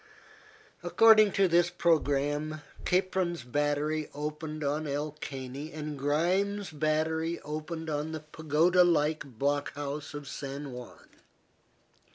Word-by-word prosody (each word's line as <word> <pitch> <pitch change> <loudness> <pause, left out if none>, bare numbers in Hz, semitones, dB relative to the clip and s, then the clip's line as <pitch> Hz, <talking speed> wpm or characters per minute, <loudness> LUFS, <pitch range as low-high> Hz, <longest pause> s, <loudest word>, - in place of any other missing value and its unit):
According 215 -2 +6
to 195 -1 +4
this 175 0 +4
programme, 155 -2 +1 0.2
Capron's 180 -4 +1
battery 145 +4 0
opened 150 +1 -4
on 150 +2 -1
El 145 +2 -2
Caney 135 +2 -6
and 150 -1 -5
Grimes's 180 +8 0
battery 160 +2 0
opened 155 +2 -5
on 150 0 -2
the 155 -1 -5
pagoda 160 +4 +3
like 155 -3 +2
block 145 +3 0
house 145 +1 -5
of 145 -1 -7
San 140 +1 -6
Juan. 125 -1 -10
155 Hz, 115 wpm, -30 LUFS, 145-170 Hz, 0.2 s, According